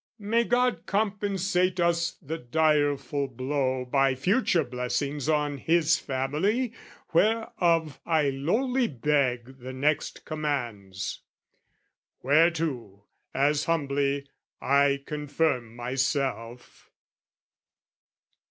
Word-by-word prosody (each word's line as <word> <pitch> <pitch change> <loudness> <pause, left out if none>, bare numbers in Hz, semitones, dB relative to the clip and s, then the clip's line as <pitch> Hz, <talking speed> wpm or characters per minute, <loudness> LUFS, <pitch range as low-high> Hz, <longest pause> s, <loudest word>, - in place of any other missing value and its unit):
"May 230 +2 +1
God 250 +1 +1
compensate 195 -3 0
us 170 -1 +1
the 160 +3 -4
direful 145 0 +1
blow 130 0 -2
"By 135 +1 +2
future 180 - +2
blessings 140 +3 -3
on 150 -2 0
his 165 +1 +3
family 155 - -1 0.4
"Whereof 170 -7 +1
I 155 -4 +2
lowly 235 - 0
beg 130 -2 -1
the 130 +1 -7
next 145 +3 -1
commands; 120 -11 -4 0.5
" - - -49
Whereto, 140 - +1 0.3
as 145 +2 +2
humbly, 140 -3 0 0.3
I 140 0 +2
confirm 150 -5 -1
myself..." 125 -1 -3
145 Hz, 90 wpm, -27 LUFS, 130-170 Hz, 0.5 s, his